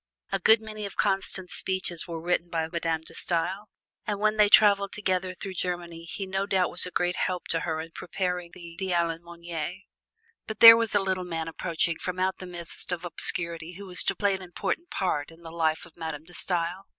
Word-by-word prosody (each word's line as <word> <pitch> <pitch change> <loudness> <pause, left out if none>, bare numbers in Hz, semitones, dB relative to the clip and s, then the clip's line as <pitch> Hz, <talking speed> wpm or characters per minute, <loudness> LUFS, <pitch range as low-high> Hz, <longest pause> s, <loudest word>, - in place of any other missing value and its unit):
A - - +1
good 220 0 +6
many 215 -1 -6
of 200 - -11
Constant's 190 -1 0
speeches 185 -3 -1
were 165 -1 -5
written 175 +1 -1
by 165 -2 -1
Madame 165 -1 -2
De 160 - -13
Stael, 185 +4 -2 0.4
and 205 -1 -1
when 215 +1 +2
they 210 -1 +5
traveled 200 -2 +5
together 185 -2 -1
through 190 +1 -6
Germany 175 -2 -4
he 195 +3 -5
no 190 +1 -2
doubt 190 -3 +1
was 180 +1 +6
a - - -5
great 180 0 0
help 180 -1 -2
to 165 - +2
her 160 -2 -2
in 160 +1 -7
preparing 180 0 -3
the 170 -2 -11
"De 190 - -2
l'Allemagne." 170 +1 -3 0.6
But 220 -1 -6
there 230 0 +12
was 230 -2 0
a 205 - +4
little 185 -1 -1
man 165 -2 -4
approaching 165 0 -1
from 180 0 -4
out 185 +1 0
the 185 - -8
mist 175 0 -4
of 175 0 -3
obscurity 170 0 -1
who 200 +3 -9
was 180 -1 +2
to - - +1
play 200 -2 +1
an 190 - -4
important 185 - -4
part 150 -6 -1
in 165 +1 -17
the 165 - -9
life 160 -1 0
of 170 - -18
Madame 160 -3 -5
De 175 +2 -15
Stael. 180 +2 -2
180 Hz, 210 wpm, -27 LUFS, 170-195 Hz, 0.6 s, there